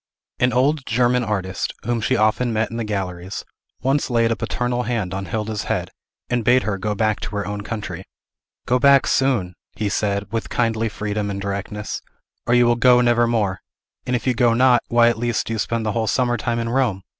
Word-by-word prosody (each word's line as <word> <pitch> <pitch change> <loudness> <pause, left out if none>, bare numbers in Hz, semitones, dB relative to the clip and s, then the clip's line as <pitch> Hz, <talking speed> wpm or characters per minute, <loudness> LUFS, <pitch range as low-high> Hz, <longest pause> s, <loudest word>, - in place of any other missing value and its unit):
An 125 0 +3
old 135 +4 +2
German 125 +1 +2
artist, 95 -4 -2
whom 120 0 -1
she 130 +4 +1
often 110 +3 +2
met 110 0 0
in 115 - -5
the 115 - -2
galleries, 95 -3 -4 0.4
once 135 +2 +1
laid 115 -1 +2
a - - +1
paternal 120 +1 -2
hand 115 -6 -2
on 95 0 -3
Hilda's 105 +1 -3
head, - - -2 0.4
and 120 -1 0
bade 125 +3 +4
her 100 -3 -2
go 105 +2 -2
back 110 0 +1
to 105 - -6
her 100 - -2
own 105 0 -4
country. 100 -4 -5 0.6
"Go 125 +1 +2
back 140 +1 +6
soon," 120 -10 +1 0.2
he 110 -2 -1
said, 100 0 -1
with 115 -1 -3
kindly 115 -1 0
freedom 105 0 -3
and 100 0 -3
directness, 100 +1 -4 0.5
"or 120 - +4
you 120 0 +5
will 120 0 +3
go 125 0 +5
never 120 -1 +3
more. 105 -5 0 0.5
And, 125 - +1
if 120 - -3
you 130 - +2
go 120 -1 +3
not, 125 -1 +5
why, 120 0 +4
at 120 -2 +1
least, 120 -1 0
do 115 - -3
you 110 - -3
spend 110 +4 -1
the 110 - 0
whole 110 0 -1
summer 120 +2 +1
time 120 +1 -2
in 115 0 -2
Rome? 115 -7 0
115 Hz, 215 wpm, -21 LUFS, 105-120 Hz, 0.6 s, back